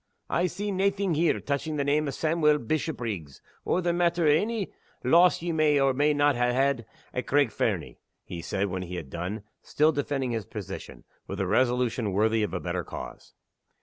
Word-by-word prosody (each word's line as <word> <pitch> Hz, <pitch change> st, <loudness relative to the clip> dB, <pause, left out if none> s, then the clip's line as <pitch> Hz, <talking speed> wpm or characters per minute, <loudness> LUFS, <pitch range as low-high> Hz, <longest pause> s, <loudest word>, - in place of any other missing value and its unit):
"I 175 Hz, +2 st, +2 dB
see 205 Hz, +4 st, -4 dB
naething 195 Hz, -1 st, +1 dB
here 165 Hz, +2 st, +2 dB
touching 145 Hz, +2 st, -2 dB
the 145 Hz, -, 0 dB
name 145 Hz, +2 st, +1 dB
o' -, -, -1 dB
Sawmuel 155 Hz, +1 st, +2 dB
Bishopriggs, 115 Hz, -, -3 dB, 0.2 s
or 180 Hz, -, +1 dB
the 170 Hz, 0 st, +1 dB
matter 170 Hz, -1 st, +2 dB
o' -, -, +6 dB
ony 215 Hz, +3 st, -1 dB, 0.3 s
loss 170 Hz, +6 st, +5 dB
ye 175 Hz, -, -1 dB
may 155 Hz, -2 st, +3 dB
or 135 Hz, -1 st, +3 dB
may 145 Hz, +3 st, +3 dB
not 145 Hz, 0 st, +3 dB
ha' -, -, -4 dB, 0.2 s
had 135 Hz, -4 st, +1 dB, 0.3 s
at 125 Hz, -, -3 dB
Craig 140 Hz, -4 st, +3 dB
Fernie," -, -, -2 dB, 0.2 s
he 85 Hz, -, -7 dB
said, 95 Hz, +4 st, -1 dB
when 95 Hz, -2 st, -3 dB
he 90 Hz, 0 st, -6 dB
had 70 Hz, -6 st, -7 dB
done; 95 Hz, +5 st, -4 dB, 0.2 s
still 155 Hz, +2 st, +2 dB
defending 140 Hz, -3 st, -2 dB
his 110 Hz, -5 st, -3 dB
position, 95 Hz, -3 st, -8 dB, 0.2 s
with 95 Hz, -, -5 dB
a 95 Hz, -, +1 dB
resolution 120 Hz, 0 st, +1 dB
worthy 110 Hz, +3 st, +2 dB
of 105 Hz, -, -1 dB
a 90 Hz, -, -2 dB
better 90 Hz, 0 st, -3 dB
cause. -, -, -9 dB
140 Hz, 190 wpm, -27 LUFS, 105-160 Hz, 0.3 s, o